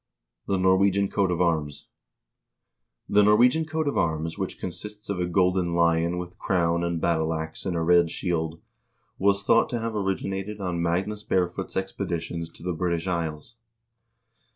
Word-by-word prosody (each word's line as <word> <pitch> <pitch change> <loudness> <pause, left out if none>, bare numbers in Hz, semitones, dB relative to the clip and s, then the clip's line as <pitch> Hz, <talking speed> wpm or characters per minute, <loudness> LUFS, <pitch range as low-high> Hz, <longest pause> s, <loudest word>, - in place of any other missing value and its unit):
The 100 - +1
Norwegian 95 +1 +3
Coat 100 -2 +1
of 90 0 0
Arms 80 -5 0 1.2
The 105 - +4
Norwegian 120 +9 +4
coat 155 0 -2
of 140 - +1
arms, 80 0 -1
which - - -4
consists 105 +4 -6
of 95 - -3
a 90 - 0
golden 90 -1 +1
lion 85 0 +2
with 90 0 -7
crown 85 -2 +1
and 85 -1 -1
battle 80 -1 +1
ax 80 +3 -5
in 90 - -1
a 85 - 0
red 85 0 +4
shield, 80 -2 -2 0.6
was 100 +1 +2
thought 115 +3 +4
to 120 - -2
have 115 0 -3
origi 95 -2 -1
nated 100 +2 -4
on 90 -3 -2
Magnus 95 +5 -1
Barefoot's 95 -1 -1
expeditions 85 -3 -3
to - - -15
the 90 0 -1
British 85 -1 -1
Isles. 85 +2 -3
90 Hz, 160 wpm, -26 LUFS, 85-100 Hz, 1.2 s, The